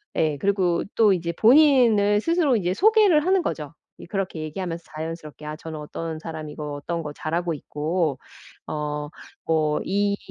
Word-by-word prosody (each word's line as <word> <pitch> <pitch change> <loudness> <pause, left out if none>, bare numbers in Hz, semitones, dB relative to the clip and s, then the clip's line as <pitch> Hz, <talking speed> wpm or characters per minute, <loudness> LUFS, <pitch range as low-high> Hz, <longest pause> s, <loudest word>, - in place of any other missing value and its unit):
예. 155 -3 +1
그리고 185 -2 +1
또 215 -3 +5
이제 170 -2 -2
본인을 230 - +5
스스로 330 -4 +2
이제 180 -2 0
소개를 410 - +4
하는 375 0 +3
거죠. 150 - -4 0.3
이 - - -9
그렇게 190 -3 -3
얘기하면서 170 +2 -4
자연스럽게 155 -1 -7
아 150 - -5
저는 160 -1 -7
어떤 160 +1 -5
사람이고 155 -2 -6
어떤 165 +4 -4
거 150 - -5
잘하고 170 +3 -2
있고 155 0 -2 0.5
어 150 -1 -3 0.4
뭐 155 -2 +1
이 200 +1 +1
170 Hz, 325 characters per minute, -24 LUFS, 155-205 Hz, 0.5 s, 또